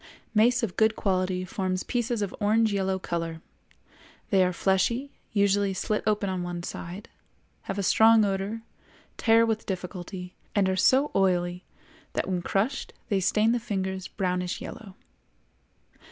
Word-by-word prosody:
Mace 235 +3 +4
of 195 -6 -2
good 220 0 +4
quality 185 -1 0
forms 185 0 -2
pieces 240 -3 -1
of 200 - -4
orange 215 +1 +3
yellow 190 -1 0
color; 165 -3 -3 0.9
they 190 -2 +5
are 180 - +2
fleshy, 200 +9 +1 0.2
usually 200 -2 +2
slit 210 +3 -1
open 210 -1 +1
on 185 -1 -2
one 175 -1 -4
side, 180 +5 -7 0.6
have - - -2
a 200 - -1
strong 220 +2 +6
odor, 200 +3 -2 0.5
tear 225 0 +5
with 225 -1 -2
difficulty, 180 -1 -5 0.2
and 200 -2 +3
are 190 - +1
so 265 +9 +4
oily 180 -1 +1 0.5
that - - -1
when 180 -2 -1
crushed 210 +9 -1 0.2
they 200 -3 +2
stain 210 +4 +3
the 240 - +1
fingers 190 -4 -3
brownish 180 -2 -2
yellow. 200 -4 -9
195 Hz, 145 wpm, -27 LUFS, 185-220 Hz, 0.9 s, strong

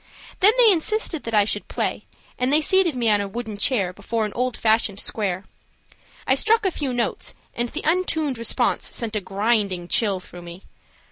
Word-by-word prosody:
Then 415 +4 +6
they 470 -3 +7
insisted 360 -2 +1
that 230 -1 -2
I 205 -1 +5
should 205 -1 -2
play, - - -3 0.3
and 250 +1 +1
they 300 - +5
seated 350 -1 +2
me 240 -2 0
on 205 -1 +3
a 200 - -3
wooden 220 +1 -6
chair 200 -4 +1
before 215 +3 -2
an 210 - -6
old 250 -1 -2
fashioned 220 -3 +1
square. 195 -5 -3 0.8
I - - +3
struck 450 -1 +2
a 380 - +2
few 285 -5 -3
notes, 245 -1 -2 0.2
and 240 0 -2
the 310 - -5
untuned 315 -6 0
response 230 - 0
sent 225 -2 -3
a 210 - -1
grinding 195 -2 0
chill 200 -1 +1
through 180 -1 -11
me. 175 +2 -11
230 Hz, 190 wpm, -22 LUFS, 200-300 Hz, 0.8 s, they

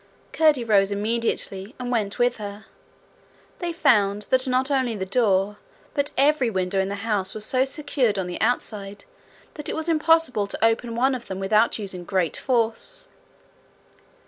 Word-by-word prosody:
Curdie 305 -6 +3
rose 205 -3 +3
immediately 210 -1 -2
and 250 -1 -4
went 215 -4 -1
with 245 0 +2
her: 205 0 -8 0.9
they 350 -2 -2
found 210 -11 +2
that 260 +1 +3
not 260 +2 +1
only 260 -4 +1
the 190 -2 -3
door, 200 -1 +1 0.4
but 285 -1 0
every 275 -2 +3
window 190 -1 -1
in 190 0 0
the 200 - -3
house 200 -4 0
was 215 -1 -3
so 260 +2 +2
secured 270 -6 0
on 190 - -1
the 175 0 -6
outside 205 -3 -2 0.5
that 300 - -6
it - - -2
was 320 +1 -2
impossible 320 -9 +3
to 220 - 0
open 230 +1 0
one 260 +3 +2
of 250 -2 -6
them 190 - -5
without 210 +4 +2
using 190 -4 -6
great 180 -2 0
force. 245 - -1
225 Hz, 165 wpm, -24 LUFS, 200-260 Hz, 0.9 s, Curdie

